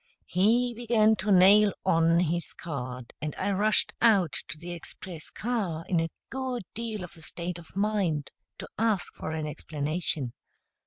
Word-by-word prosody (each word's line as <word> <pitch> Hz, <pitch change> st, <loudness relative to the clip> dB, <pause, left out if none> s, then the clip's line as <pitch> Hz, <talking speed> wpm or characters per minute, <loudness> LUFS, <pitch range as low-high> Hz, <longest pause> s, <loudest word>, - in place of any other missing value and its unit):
He 235 Hz, +7 st, +3 dB
began 220 Hz, -2 st, +3 dB
to 205 Hz, +2 st, 0 dB
nail 200 Hz, +2 st, +7 dB
on 165 Hz, -1 st, +4 dB
his 170 Hz, 0 st, -1 dB
card, 125 Hz, -6 st, -6 dB
and 150 Hz, -1 st, -3 dB
I 200 Hz, +2 st, 0 dB
rushed 210 Hz, +2 st, +3 dB
out 200 Hz, -9 st, +4 dB
to -, -, -7 dB
the 170 Hz, +3 st, -7 dB
express 175 Hz, -1 st, -8 dB
car, 200 Hz, -9 st, -2 dB
in 175 Hz, -3 st, +2 dB
a 165 Hz, 0 st, 0 dB, 0.2 s
good 260 Hz, -3 st, -3 dB
deal 220 Hz, -3 st, -4 dB
of 180 Hz, -, -10 dB
a 165 Hz, -, -15 dB
state 170 Hz, +2 st, -5 dB
of 165 Hz, -, -16 dB
mind, 195 Hz, -8 st, 0 dB, 0.3 s
to -, -, -7 dB
ask 220 Hz, -4 st, +1 dB
for -, -, -6 dB
an 160 Hz, -1 st, -2 dB
explanation. 150 Hz, -3 st, -2 dB
180 Hz, 160 wpm, -28 LUFS, 160-215 Hz, 0.3 s, nail